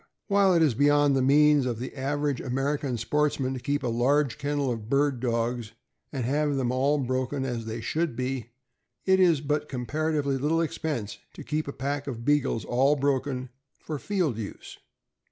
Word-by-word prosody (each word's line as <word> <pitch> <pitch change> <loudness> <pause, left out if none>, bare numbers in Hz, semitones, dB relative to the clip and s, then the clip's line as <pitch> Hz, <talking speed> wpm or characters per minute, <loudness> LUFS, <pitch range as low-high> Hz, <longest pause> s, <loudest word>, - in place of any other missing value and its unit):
While 200 -2 +4
it 165 - +5
is 150 -6 +3
beyond 145 +2 +4
the 135 - +2
means 145 0 +5
of 120 -3 -2
the 125 +4 -6
average 145 0 -1
American 135 0 -1
sportsman 145 0 0
to 130 - -4
keep 140 +3 -2
a - - 0
large 125 +2 +1
kennel 145 -2 -1
of 110 -2 -5
bird 140 -1 +2
dogs 115 -1 -1 0.4
and 130 -5 -3
have 145 +2 +1
them 125 -3 0
all 135 +3 +2
broken 130 +1 -1
as 120 -3 -4
they 115 +1 -4
should 155 +3 -1
be, 125 -1 -3 0.6
it 190 0 +4
is 170 -6 +4
but 150 +1 -1
comparatively 140 +2 -1
little 160 +4 +1
expense 145 -9 -3 0.2
to - - -8
keep 155 0 -2
a - - -3
pack 140 +1 -3
of 120 -4 -5
Beagles 135 -8 +1
all 135 +4 +3
broken 135 -2 -1 0.3
for 155 -2 -6
field 175 - -1
use. 105 - -8
140 Hz, 175 wpm, -27 LUFS, 125-150 Hz, 0.6 s, it